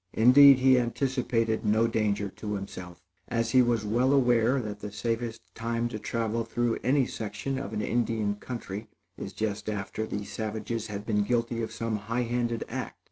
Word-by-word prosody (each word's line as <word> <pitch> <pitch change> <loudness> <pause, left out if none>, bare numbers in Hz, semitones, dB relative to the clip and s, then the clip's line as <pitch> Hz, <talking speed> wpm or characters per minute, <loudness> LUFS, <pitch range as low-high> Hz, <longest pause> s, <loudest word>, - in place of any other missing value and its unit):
Indeed, 135 +4 +8
he 130 0 +5
anticipated 120 -2 0
no 110 +1 +3
danger 105 -3 0
to 105 +2 -5
himself, 90 -3 -8 0.2
as 115 0 -1
he 130 - +6
was 120 -3 +1
well 120 +6 +2
aware, 125 -1 +3
that 105 -4 -5
the 105 0 -6
safest 115 +1 -2
time 115 +1 -2
to 110 -2 -5
travel 115 +1 -1
through 115 +1 -1
any 135 +1 +3
section 110 +5 -4
of 135 - -5
an 105 -1 -2
Indian 115 -3 0
country, 105 -1 -6 0.3
is - - -6
just 105 -1 -3
after 105 +1 -3
the 105 -1 -4
savages 110 +2 -4
have 105 -1 -6
been 105 -2 +1
guilty 115 +1 0
of 110 -1 -3
some 110 0 -2
highhanded 120 +2 -1
act. - - -5
115 Hz, 170 wpm, -28 LUFS, 105-120 Hz, 0.3 s, Indeed